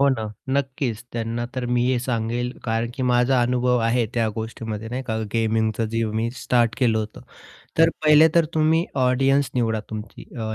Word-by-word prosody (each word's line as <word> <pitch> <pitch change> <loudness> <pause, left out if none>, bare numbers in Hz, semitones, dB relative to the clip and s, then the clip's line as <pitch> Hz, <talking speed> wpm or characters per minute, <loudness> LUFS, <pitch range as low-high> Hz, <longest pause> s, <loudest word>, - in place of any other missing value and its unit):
हो 140 - +5
ना, 125 -5 0 0.3
नक्कीच. 130 -4 -2
त्यांना 115 0 -3
तर 130 -1 -2
मी 120 0 +1
हे 125 -1 +2
सांगेल, 120 0 -2
कारण 115 0 -1
की 130 - -4
माझा 125 +1 +3
अनुभव 125 0 +2
आहे 120 0 +2
त्या 115 -2 +1
गोष्टीमध्ये 110 -1 -5
नाही 125 +2 -4
का? 110 -1 -1 0.2
गेमिंगचं 110 -1 +1
जे 115 0 +1
मी 115 +2 -1
स्टार्ट 120 -2 +1
केलं 115 -4 +2
होतं. 110 0 -5 0.6
तर 165 0 +6
पहिले 155 +1 +7
तर 170 -1 +5
तुम्ही 160 +2 +3 0.2
ऑडियन्स 135 +1 +2
निवडा 115 -3 0
तुमची 110 0 -7
अ, 110 -1 -3
120 Hz, 175 wpm, -23 LUFS, 115-130 Hz, 0.6 s, पहिले